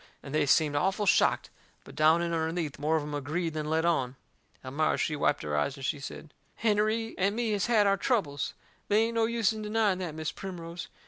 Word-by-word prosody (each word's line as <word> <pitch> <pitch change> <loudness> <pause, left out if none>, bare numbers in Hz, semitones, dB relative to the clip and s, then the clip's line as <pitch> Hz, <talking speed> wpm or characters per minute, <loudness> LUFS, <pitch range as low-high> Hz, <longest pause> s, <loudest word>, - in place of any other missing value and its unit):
And 140 - -8
they 155 -1 +2
seemed 150 +1 +3
awful 190 +7 +1
shocked. 185 - +3 0.3
But - - -13
down 160 +2 +4
in 170 0 -2
underneath 160 -2 -2
more 155 +2 +1
of 155 - 0
em 150 0 -6
agreed 155 +4 -2
than 155 -1 -3
let 160 +1 +1
on. 135 -7 +1 0.5
Elmira 145 +4 0
she 155 - 0
wiped 145 - +1
her 75 -1 -2
eyes 75 - 0
and 135 - -6
she 145 0 -1
said: 145 +2 -9 0.3
"Hennerey 220 +1 +1
and 200 +2 +2
me 235 -1 0
has 205 -1 0
had 220 -3 +4
our 200 0 +3
troubles. 185 - -1 0.3
They 210 +2 +4
ain't 230 +1 -2
any 225 +1 +2
use 230 -2 +2
in 215 - -6
denying 210 -3 +1
that, 170 -4 -4
Mis' 155 -1 -3
Primrose. 175 -2 -7
170 Hz, 215 wpm, -29 LUFS, 150-210 Hz, 0.5 s, down